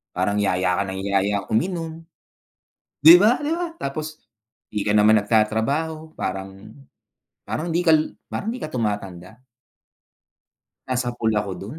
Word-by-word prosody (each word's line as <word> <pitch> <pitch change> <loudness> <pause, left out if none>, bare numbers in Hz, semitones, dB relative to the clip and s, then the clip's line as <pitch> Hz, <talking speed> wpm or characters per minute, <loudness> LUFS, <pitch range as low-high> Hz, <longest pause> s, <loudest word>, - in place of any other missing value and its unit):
parang 100 +3 0
yaya 90 -2 +1
ka 100 - +1
nang 95 0 -5
yaya 100 +1 0
uminom. 165 - -1 1.0
'Di 160 +4 +10
ba, 225 +4 +4
'di 295 +1 -3
ba, 350 0 -2
tapos 155 +2 -5 0.5
'di 105 -2 -3
ka 105 - 0
naman 105 +1 +5
nagtatrabaho 140 +10 0
parang, 95 +2 -6 0.7
parang 165 +3 -3
'di 165 +2 +1
kal 160 -1 +6 0.3
parang 220 - -4
'di 245 - -5
ka - - -2
tumatanda. 105 -2 -4 1.5
Nasapul 120 -3 -1
ako 100 -2 -5
dun. 110 +11 -8
110 Hz, 130 wpm, -22 LUFS, 100-160 Hz, 1.5 s, Di